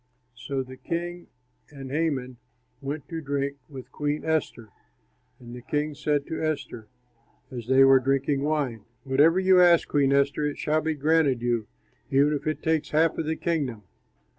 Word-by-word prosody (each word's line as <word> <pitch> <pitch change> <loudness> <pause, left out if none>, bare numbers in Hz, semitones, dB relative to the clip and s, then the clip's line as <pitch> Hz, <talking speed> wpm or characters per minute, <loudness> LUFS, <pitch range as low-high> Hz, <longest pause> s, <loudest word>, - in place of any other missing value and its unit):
So 135 +1 -4
the 130 0 -12
king 175 +5 -5 0.4
and 135 -2 -9
Haman 135 -5 -2 0.4
went 140 +1 -5
to 165 -1 -5
drink 140 -1 -2
with 135 -3 -10
Queen 150 0 -3
Esther. 155 -8 -2 0.7
And 120 -1 -10
the 125 - -9
king 150 +4 -2
said 145 -1 -1
to 160 - -5
Esther, 145 -8 -3 0.6
as 120 -3 -7
they 130 +1 +5
were 135 0 +7
drinking 135 +1 0
wine, 140 -7 -1 0.2
"Whatever 145 +6 +3
you 185 -1 +5
ask, 175 -2 +5
Queen 140 -2 +2
Esther, 140 +2 +2
it 145 - -4
shall 155 +1 0
be 160 0 -1
granted 145 -4 +2
you, 120 -3 0 0.4
even 140 +2 +3
if 145 - -4
it 155 - -2
takes 160 -1 0
half 160 +1 +2
of 160 - -2
the 160 - 0
kingdom." 140 -12 -2
145 Hz, 165 wpm, -26 LUFS, 130-155 Hz, 0.7 s, were